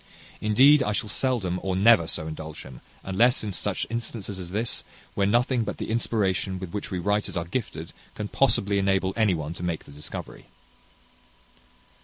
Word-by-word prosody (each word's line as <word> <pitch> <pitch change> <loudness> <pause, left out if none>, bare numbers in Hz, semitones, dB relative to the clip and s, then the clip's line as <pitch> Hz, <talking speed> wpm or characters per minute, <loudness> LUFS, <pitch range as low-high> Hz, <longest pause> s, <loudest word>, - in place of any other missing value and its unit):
Indeed, 130 +8 +6
I 105 -5 0
shall 105 +1 -2
seldom 100 -7 0
or 95 -1 -1
never 100 -3 +5
so 80 - -2
indulge 80 0 -7
him, 65 -2 -12 0.2
unless 115 +7 +3
in 105 - -3
such 90 - -2
instances 110 -4 -4
as 90 -2 -7
this, 110 +5 -1 0.3
where 100 -1 +1
nothing 120 +2 +2
but - - -4
the - - -4
inspiration 100 -5 0
with 90 -2 -7
which 105 - -4
we 95 - -3
writers 105 +2 0
are 85 - -1
gifted, 85 -5 -4 0.2
can 105 - -4
possibly 105 -5 +2
enable 95 -1 +1
any 110 -5 +3
one 80 0 -4
to 85 - -10
make 85 -2 -2
the - - -15
discovery. 75 +1 -8
100 Hz, 175 wpm, -26 LUFS, 90-115 Hz, 0.3 s, Indeed